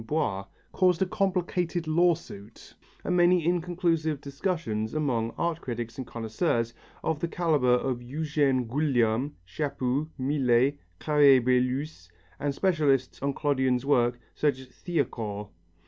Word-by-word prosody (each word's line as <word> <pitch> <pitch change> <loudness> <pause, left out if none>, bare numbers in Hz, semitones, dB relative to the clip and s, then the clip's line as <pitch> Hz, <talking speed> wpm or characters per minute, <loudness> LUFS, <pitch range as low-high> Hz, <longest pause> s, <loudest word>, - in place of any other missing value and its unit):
Boiss 110 -7 -1 0.2
caused 180 -3 +3
a - - 0
complicated 180 -3 -1
lawsuit 160 - -1 0.3
and 180 - 0
many 175 -1 +4
inconclusive 170 -3 0
discussions 140 - -3
among 125 -7 0
art 170 -1 -1
critics 120 -1 -5
and 130 - -5
connoisseurs 115 +1 -1 0.3
of 160 -2 -1
the 170 - -1
calibre 160 -7 +1
of 125 0 0
Eugène 140 -1 0
Guillaume, 130 -1 +1
Chapu, 140 - -2
Millet, 135 0 +2 0.2
Carrier 145 - +5
Belleuse, 125 - 0 0.3
and 140 -1 -1
specialists 145 -9 +1
on 140 +1 0
Clodion's 130 -3 +1
work 120 -3 +2
such 145 -3 +1
as 130 -1 -12
Thiacourt. 115 - -3
140 Hz, 120 wpm, -27 LUFS, 120-160 Hz, 0.3 s, Carrier